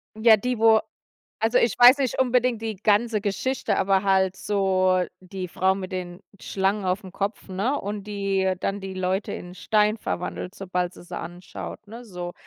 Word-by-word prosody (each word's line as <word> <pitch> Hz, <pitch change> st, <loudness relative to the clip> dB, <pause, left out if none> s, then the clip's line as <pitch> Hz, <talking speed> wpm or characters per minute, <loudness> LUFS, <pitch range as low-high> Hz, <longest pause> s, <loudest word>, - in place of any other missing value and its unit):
Ja, 220 Hz, 0 st, +6 dB
die, 245 Hz, +2 st, -2 dB
wo 225 Hz, -1 st, +6 dB, 0.6 s
also, 225 Hz, +3 st, +2 dB
ich 235 Hz, -, +1 dB
weiß 245 Hz, +3 st, +9 dB
nicht 265 Hz, -3 st, -1 dB
unbedingt 250 Hz, -2 st, +2 dB
die 220 Hz, -2 st, -3 dB
ganze 215 Hz, +2 st, +2 dB
Geschichte, 220 Hz, +6 st, -1 dB
aber 195 Hz, 0 st, +2 dB
halt 190 Hz, -1 st, +2 dB
so 185 Hz, -2 st, +1 dB, 0.2 s
die 185 Hz, 0 st, -6 dB
Frau 190 Hz, +3 st, +1 dB
mit 190 Hz, -1 st, -6 dB
den 180 Hz, 0 st, -5 dB, 0.2 s
Schlangen 195 Hz, +1 st, -1 dB
aufm 185 Hz, 0 st, -2 dB
Kopf, 200 Hz, +2 st, -4 dB
ne 205 Hz, +10 st, -1 dB
und, 205 Hz, 0 st, -5 dB
die 195 Hz, -2 st, 0 dB
dann 200 Hz, +1 st, -2 dB
die 190 Hz, -1 st, -6 dB
Leute 185 Hz, +2 st, -1 dB
in 180 Hz, 0 st, -8 dB
Stein 210 Hz, +3 st, +1 dB
verwandelt, 180 Hz, -1 st, -4 dB
sobald 180 Hz, -2 st, -3 dB
sie -, -, -13 dB
sie -, -, -6 dB
anschaut, 175 Hz, +4 st, -8 dB
ne, 230 Hz, +4 st, -10 dB
so. 180 Hz, -3 st, -6 dB
195 Hz, 175 wpm, -24 LUFS, 185-220 Hz, 0.6 s, weiß